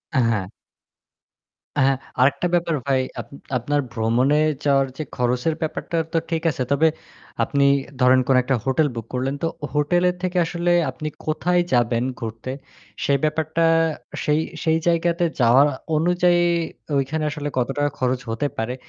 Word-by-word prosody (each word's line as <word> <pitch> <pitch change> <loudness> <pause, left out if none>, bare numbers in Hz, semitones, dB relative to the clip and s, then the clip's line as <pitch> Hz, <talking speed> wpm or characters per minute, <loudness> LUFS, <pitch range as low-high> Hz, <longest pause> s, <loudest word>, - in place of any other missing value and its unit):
হ্যাঁ। 115 -7 +1 1.3
হ্যাঁ, 135 -1 +4 0.2
আরেকটা 140 +7 +3
ব্যাপার 170 -2 +1
ভাই, 135 -1 +2 0.2
আপ - - -8 0.3
আপনার 145 +4 0
ভ্রমণে 120 +6 +2 0.3
যাওয়ার 140 -1 +3
যে 155 - -3
খরচের 125 +5 0
ব্যাপারটা 160 +1 -3 0.2
তো 165 - +2
ঠিক 165 -1 -1
আছে। 130 -3 -3
তবে 160 +3 +4 0.5
আপনি 140 -1 +1 0.4
ধরেন 130 +1 +5
কোন 135 - +4
একটা 130 +1 0
হোটেল 135 +4 +2
বুক 115 -1 -5
করলেন 130 +2 -1
তো - - +1 0.3
হোটেলের 175 +5 +2
থেকে 180 0 -1
আসলে 175 +1 0 0.2
আপনি 155 - -5 0.2
কোথায় 175 +3 +1
যাবেন 120 -1 +2 0.2
ঘুরতে 115 +2 -5 0.5
সেই 140 -1 +2
ব্যাপারটা 160 +2 0 0.6
সেই 150 +1 +2 0.2
সেই 160 -1 +3
জায়গাতে 170 +1 +2 0.2
যাওয়ার 125 +4 +6 0.3
অনুযায়ী 175 +2 +3 0.6
ঐখানে 150 +3 -1
আসলে 145 -1 -4
কত 120 - +1
টাকা 145 0 +1
খরচ 125 0 0
হতে 115 +6 -1
পারে 110 +3 -2
145 Hz, 145 wpm, -22 LUFS, 125-165 Hz, 1.3 s, যাওয়ার